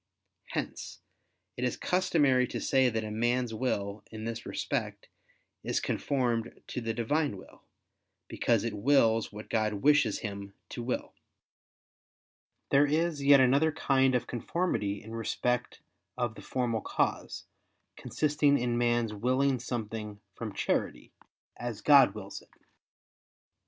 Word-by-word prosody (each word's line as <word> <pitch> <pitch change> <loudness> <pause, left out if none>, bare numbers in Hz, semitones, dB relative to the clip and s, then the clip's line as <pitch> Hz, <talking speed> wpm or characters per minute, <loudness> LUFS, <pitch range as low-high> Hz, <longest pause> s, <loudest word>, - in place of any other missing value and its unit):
Hence - - -5 0.6
it 125 - -3
is 125 - 0
customary 145 -9 +2
to - - -4
say 130 -2 +3
that 110 -1 -2
a 105 - -5
man's 120 +2 0
will, 105 -4 -2
in 110 -1 -8
this 115 0 -5
respect, - - -3 0.5
is - - 0
conformed 120 -5 -1
to 125 - -4
the 115 0 -2
Divine 120 +2 0
will, - - -15 0.7
because 115 -3 +1
it 115 -2 -2
wills 115 0 +3
what 105 +1 -9
God 110 -1 0
wishes 140 -1 +3
him 100 -2 -6
to 120 - -6
will. 125 +2 -3 1.6
There 140 +1 +5
is 155 0 0
yet 140 -1 +7
another 140 +5 +4
kind 135 -3 +2
of 125 - 0
conformity 120 - -2
in 110 +1 -9
respect 125 +2 -2 0.4
of 120 -2 -1
the - - -11
formal 120 -4 -1
cause, - - -2 0.5
consisting 150 -1 +1
in 120 -1 0
man's 120 -2 +1
willing 130 +4 +1
something 110 -3 -5
from - - -6
charity, - - -2 0.5
as 120 -3 -5
God 140 -5 +6
wills 100 -2 -7
it. - - -23
120 Hz, 130 wpm, -30 LUFS, 110-135 Hz, 1.6 s, yet